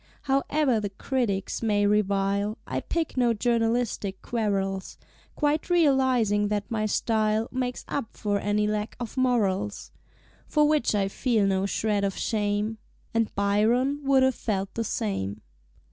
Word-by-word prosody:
Howe'er 275 -2 +1
the 205 -1 -3
Critics 200 -2 -2
may 205 -2 +2
revile, 200 0 +1
I - - -2
pick 330 -5 -3
no 240 -2 +3
journalistic 225 -3 0
quarrels, 195 -4 -2 0.4
Quite 300 +2 0
realizing 260 - +3
that 205 0 -2
my 215 -1 0
Style 220 +1 +1
Makes 250 -1 -3
up 255 -6 -4
for 205 -1 0
any 205 +1 +1
lack 210 0 -2
of 240 -2 -6
Morals; 210 -6 0 0.6
For 300 -1 +3
which 300 -8 +2
I 195 -1 +1
feel 220 +1 +1
no 195 0 +1
shred 205 0 0
of 195 -1 -1
shame 210 0 -1 0.3
(And 230 -1 +1
Byron 225 +8 +2
would 270 -1 +4
have 260 0 +3
felt 195 -4 -3
the 230 - -2
same). 195 - -3
215 Hz, 140 wpm, -26 LUFS, 205-250 Hz, 0.6 s, would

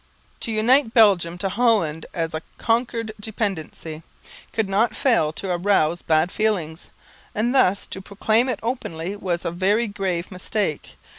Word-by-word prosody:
_ - - -36
To 230 - -1
unite 230 +3 +3
Belgium 185 -7 +5
to 195 - -1
Holland, 200 -8 +1
as 165 -2 -3
a 155 - -3 0.2
conquered 230 -1 0
dependency, 190 -7 -4 0.5
could 220 -3 0
not 205 +5 +1
fail 235 - +2
to 190 +3 -4
arouse 175 -2 +2
bad 160 +2 +2
feelings; 180 -7 -1 0.5
and 235 +4 +1
thus 200 -7 +3
to 190 - -7
proclaim 215 +5 +1
it - - -2
openly 200 -7 -3
was 180 -4 -3
a - - 0
very 195 +6 +2
grave 190 -4 -3
mistake. 185 -3 -3
200 Hz, 150 wpm, -23 LUFS, 170-225 Hz, 0.5 s, Belgium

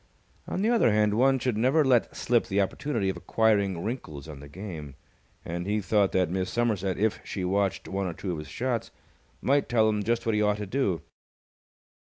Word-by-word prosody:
On 190 - -2
the 220 - +3
other 230 - +4
hand, 105 0 +3
one 135 +4 +4
should 125 -2 -1
never 135 +7 +3
let 125 -3 +2
slip 120 -1 +1
the 100 - 0
opportunity 115 +2 -1
of 95 - -3
acquiring 100 -6 +1
wrinkles 80 - -5
on 75 -3 -9
the 70 0 -11
game, 80 -5 -8 0.5
and 85 +2 -4
he 105 +1 +1
thought 100 -1 +2
that 90 -3 +2
Miss 95 0 -1
Somerset, 100 -6 0
if 110 +1 +1
she 95 -3 -4
watched 100 +1 0
one 95 0 -2
or 85 - -3
two 95 - -4
of 85 - -3
his 75 - -8
shots, 120 - -2 0.5
might 140 +1 +2
tell 110 -2 +4
him 105 -1 +1
just 115 +3 0
what 115 - +1
he 105 - +2
ought 105 0 +2
to 105 - -4
do. 100 -6 -1
105 Hz, 200 wpm, -27 LUFS, 95-120 Hz, 0.5 s, other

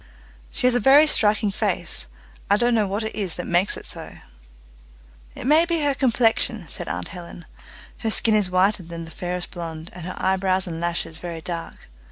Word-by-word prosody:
"She - - -2
has 250 - +5
a 245 - +2
very 275 +6 +7
striking 215 -6 +3
face. 195 - -2 0.4
I 205 - +5
don't 240 +2 +2
know 215 -3 +2
what 200 +3 -2
it 220 - -4
is 195 -6 -2
that 175 - -5
makes 175 +3 +1
it - - -9
so." - - -7 1.2
"It - - -6
may 305 +5 +6
be 340 -2 0
her 285 -1 +2
complexion," 230 - +1
said - - -5
aunt 90 0 -4
Helen; 175 -1 -10 0.5
"her 225 - -1
skin 220 0 +3
is 210 -3 +3
whiter 185 +2 +3
than 170 -1 -7
the 165 - -11
fairest 180 +1 -4
blonde, 165 -2 -7
and 175 -1 -8
her 185 - -5
eyebrows 190 0 +1
and 165 -2 -5
lashes 170 -2 -2
very 170 -1 -6
dark. 170 0 -6
190 Hz, 195 wpm, -23 LUFS, 175-225 Hz, 1.2 s, very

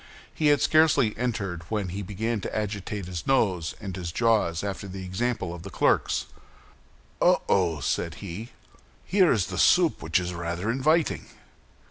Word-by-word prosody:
He 155 - +1
had 145 -1 +4
scarcely 155 -8 +4
entered 105 -8 -2
when 105 -4 -2
he 95 +4 -4
began 105 +3 -2
to - - -4
agitate 105 -2 -3
his 85 -3 -6
nose 95 - +1
and 95 -4 -6
his 90 -3 -5
jaws 105 -5 +1
after 100 0 -4
the 95 0 -7
example 95 -1 -2
of 85 -1 -9
his 100 - -8
clerks. - - +2 1.0
"Oh, - - +4
oh!" 85 -5 +2
said 85 -1 -1
he; 100 +4 -7 0.6
"here 185 -2 +4
is 105 -6 0
a - - -3
soup 175 -3 +4
which 80 +3 +1
is 90 0 -4
rather 85 +5 -2
inviting." 155 +6 +1
100 Hz, 160 wpm, -26 LUFS, 90-115 Hz, 1.0 s, had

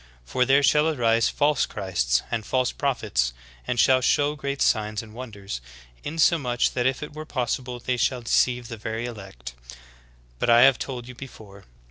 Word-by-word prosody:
For 125 - +1
there 135 +2 +4
shall 150 +2 +4
arise 115 -6 +2
false 145 0 +1
Christs - - -1
and 115 -2 -1
false 130 +3 0
prophets, 105 - -1 0.3
and 120 - -1
shall 130 +2 +5
shew 145 +3 +2
great 140 -1 -4
signs 105 -1 +1
and 110 -1 -14
wonders; 100 - -7 0.4
insomuch 145 -5 +1
that 125 0 0
if 130 +2 -1
it 150 - -8
were 155 +1 -7
possible 125 -3 -3
they 125 +1 -2
shall 120 +1 0
deceive 120 +1 +1
the 115 -1 -7
very 110 +2 -4
elect. 95 - -9 0.9
Behold 120 0 +4
I - - +7
have 135 0 +6
told 125 -3 -5
you 125 - -9
before. 110 -6 -12
120 Hz, 170 wpm, -24 LUFS, 110-135 Hz, 0.9 s, I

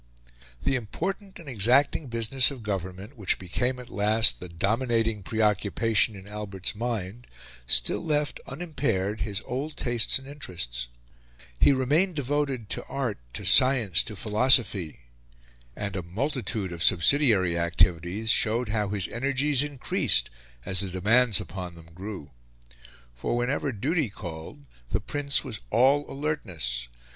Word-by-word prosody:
The 135 - +1
important 185 - -4
and 170 - -13
exacting 130 +5 +2
business 115 +2 +3
of 135 -5 -8
government, 95 +3 -5
which 100 -6 0
became 125 +8 -2
at 125 -1 -11
last 105 +2 +3
the 90 - -8
dominating 115 +4 0
preoccupation 105 +1 +1
in 95 0 -12
Albert's 100 -3 -4
mind, 115 0 -4 0.4
still - - +3
left 150 -2 -1
unimpaired 130 - -2
his 105 -2 -3
old 140 +5 -4
tastes 120 -2 +1
and 135 0 -11
interests; 75 - -5 0.7
he - - +6
remained 150 +8 +1
devoted 140 -4 -1
to - - -1
art, 130 - -3
to - - -5
science, 120 -9 +6
to 105 - -6
philosophy, 105 - +2 0.7
and 100 -2 -4
a 95 - -2
multitude 110 - -2
of 85 -1 -7
subsidiary 95 - +4
activities 85 +5 +1
showed 115 +1 +2
how 105 -1 0
his 100 -1 -1
energies 135 +2 0
increased 145 - 0 0.3
as 95 -2 +3
the 95 - +3
demands 110 +5 +3
upon 90 -1 -7
them 85 0 -15
grew. 90 -5 -8 0.8
For - - -2
whenever 135 +3 -1
duty 135 - -1
called, 80 -7 -9 0.2
the - - 0
Prince 140 -1 0
was - - -5
all 135 - +3
alertness. 90 - -3
110 Hz, 135 wpm, -26 LUFS, 95-135 Hz, 0.8 s, he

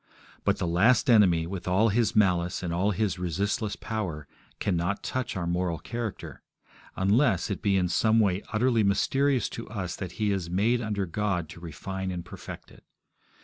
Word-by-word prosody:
But - - +2
the - - -2
last 110 +10 +4
enemy, 90 -7 +5
with 90 0 -6
all 95 +5 +3
his 110 +1 +1
malice 90 -3 +2
and 85 -1 -2
all 95 +4 +1
his 100 -2 -1
resistless 100 +4 -1
power, 90 -11 -4 0.3
cannot 90 +1 -1
touch 130 -6 -3
our 85 - -2
moral 85 -1 -1
character 115 +3 -6 0.5
unless 100 - +2
it 100 - -3
be 100 -2 +2
in 90 -1 +2
some 110 +6 +3
way 100 -3 +2
utterly 115 +1 +2
mysterious 130 +7 +2
to 115 - -7
us 95 -6 -4
that 90 -3 -6
he 105 +1 0
is 95 -4 -2
made 110 +7 +2
under 105 -3 -1
God 95 -2 -1
to 85 - -10
refine 95 +3 -5
and 90 -1 -5
perfect - - -10
it. - - -18
95 Hz, 175 wpm, -27 LUFS, 90-110 Hz, 0.5 s, enemy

